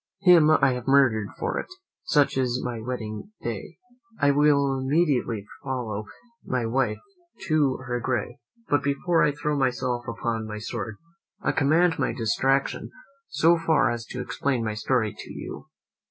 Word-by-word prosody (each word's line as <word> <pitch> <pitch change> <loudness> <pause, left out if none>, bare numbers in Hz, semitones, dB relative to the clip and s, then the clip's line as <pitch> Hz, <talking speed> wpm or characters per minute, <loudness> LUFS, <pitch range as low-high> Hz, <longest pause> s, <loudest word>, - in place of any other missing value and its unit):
Him 175 -5 +7
I 135 -4 +4
have 125 0 -6
murdered 125 -7 +4
for - - -2
it. - - -5 0.4
Such 145 -2 +3
is 125 -1 0
my 120 -2 -3
wedding 115 - -5
day. 120 - -5 0.4
I 145 0 +4
will 140 -1 +3
immediately 130 -7 +1 0.2
follow 120 -6 -3 0.4
my 125 -2 -1
wife 130 +4 0 0.5
to 150 -5 +2
her 120 -1 -2
grave, 120 0 -2 0.3
but 145 - +2
before 145 +5 +1
I 150 - +4
throw 150 +1 -2
myself 125 -2 -1
upon 115 -1 -3
my 105 0 -5
sword, 105 0 -5 0.5
I - - +2
command 165 +4 +3
my - - 0
distraction 135 +4 0 0.4
so 165 +1 +3
far 160 -5 +3
as 120 -1 -4
to 125 - -5
explain 130 -1 -1
my 110 - -1
story 110 0 0
to - - -10
you. - - -8
130 Hz, 155 wpm, -25 LUFS, 115-145 Hz, 0.5 s, Him